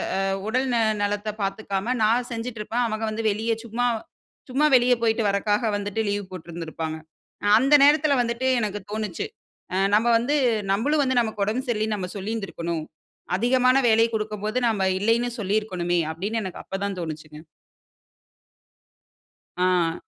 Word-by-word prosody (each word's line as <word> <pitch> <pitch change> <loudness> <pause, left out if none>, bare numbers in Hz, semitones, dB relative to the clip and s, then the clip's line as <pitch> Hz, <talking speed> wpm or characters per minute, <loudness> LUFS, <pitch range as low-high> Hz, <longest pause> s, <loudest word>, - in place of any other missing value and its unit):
அ - - 0 0.3
உடல் 255 +4 0
ந - - +3 0.2
நலத்த 205 +1 -1
பார்த்துக்காம, 195 +3 -2
நான் 235 +3 +2
செஞ்சிட்டுருப்பேன். 230 0 -3
அவங்க 220 0 -3
வந்து 225 +1 -4
வெளிய 220 +3 -1
சும்மா 240 +2 -1 0.6
சும்மா 275 +4 +2
வெளியே 245 0 +5
போய்விட்டு 225 -1 +1
வறக்காக 205 +3 +1
வந்துட்டு 205 +1 -2
லீவ் 205 -1 -2
போட்ருந்திருப்பாங்க. 165 -2 -6 0.5
அ - - +2
அந்த 275 +4 +2
நேரத்துல 295 0 +5
வந்துட்டு 240 +2 -1
எனக்கு 210 -2 -2
தோன்னுச்சி. 215 - -3 0.5
அ - - 0 0.2
நம்ம 220 +3 +3
வந்து, 265 +6 0 0.4
நம்மளும் 285 +10 +2
வந்து 260 -2 +2
நமக்கு 220 -3 -2
உடம்பு 225 +5 -1
சரியில்லன்னு 215 -2 0
நம்ம 180 -1 -4
சொல்லியிருந்திருக்கணும். 190 -6 -4 0.5
அதிகமான 255 +3 +3
வேலை 225 0 +5
குடுக்கும்போது 215 +1 -2
நம்ம 205 -4 0 0.2
இல்லன்னு 230 +3 +2
சொல்லி 205 0 -1
இருக்கணுமே. 175 -4 -1
அப்படின்னு 205 +7 -3
எனக்கு 185 - -6
அப்பதான் 195 0 -4
தோனுச்சுங்க. 155 -2 -7 2.2
ஆ. 180 -2 +1
215 Hz, 135 wpm, -24 LUFS, 195-235 Hz, 2.2 s, வெளியே